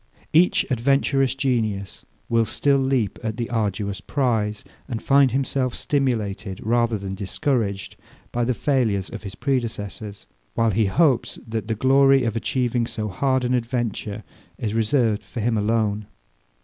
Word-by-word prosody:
Each 175 +3 +4
adventurous 135 +1 +2
genius 110 -7 -2 0.2
will 115 -1 +3
still 140 +4 +2
leap 130 -6 0
at 110 -2 -3
the 120 -1 -3
arduous 100 -3 -1
prize, 110 -5 0 0.2
and 120 -5 -3
find 140 +1 +4
himself 130 0 -1
stimulated, 110 -8 -1
rather 115 0 +2
that 95 -1 -5
discouraged, 105 -1 -2 0.3
by 120 - 0
the 125 +1 0
failures 110 -10 0
of 115 - -6
his 100 -3 -7
predecessors; 110 -6 -3 0.3
while 115 -1 +2
he 105 +1 +2
hopes 135 - +2
that 110 -1 -3
the 110 - -1
glory 135 +2 +5
of 115 -2 -1
achieving 120 0 0
so 105 -3 -4
hard 130 +6 +1
an 125 - +1
adventure 115 -3 -2 0.3
is 110 -4 -3
reserved 115 -1 +2
for 120 - -8
him 115 +1 +1
alone. 105 -1 0
115 Hz, 145 wpm, -23 LUFS, 105-130 Hz, 0.3 s, glory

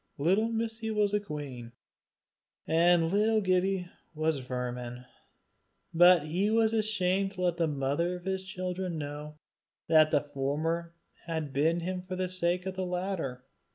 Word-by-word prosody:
Little 190 +10 +2
Missie 225 0 -2
was 210 -2 +1
a 210 - +3
queen, 140 - -7 0.9
and 165 0 +3
little 215 +2 +3
Gibbie 185 -1 +1 0.3
was 155 0 +1
a - - -6
vermin, 125 -1 -5 0.9
but 175 -1 +6
he 180 +7 0
was 225 0 +3
ashamed 195 -3 +1
to 185 - -6
let 175 -1 +1
the 165 -1 +2
mother 145 +5 -1
of 180 0 -10
his 190 0 -2
children 185 -2 -4
know 150 +1 -6 0.5
that 155 -1 +6
the 145 -2 +3
former 165 +5 -2 0.3
had 160 -4 -3
bitten 160 +5 +2
him 180 +1 -3
for 185 0 -6
the 185 0 -2
sake 180 0 0
of 190 -1 -4
the 190 - -2
latter. 180 -8 -3
175 Hz, 155 wpm, -30 LUFS, 150-190 Hz, 0.9 s, but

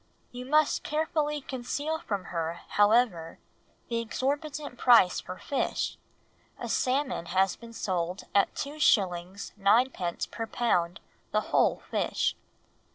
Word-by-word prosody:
You 250 +1 -7
must 305 +1 +3
carefully 300 -1 -1
conceal 285 +5 -3
from 200 -8 -3
her, 165 0 -3
however, 205 -6 +2 0.5
the 235 -1 -1
exorbitant 280 +3 -3
price 235 -8 +6
for 185 - -8
fish; 280 - -2 0.6
a - - -4
salmon 260 -8 0
has 190 0 +2
been 235 -1 -12
sold 180 -3 -2
at 200 - +3
2s. 195 - 0
9d. 200 -4 +2
per 225 -1 -4
pound 180 -8 0 0.3
the - - +1
whole - - +1
fish." - - 0
230 Hz, 115 wpm, -28 LUFS, 185-280 Hz, 0.6 s, price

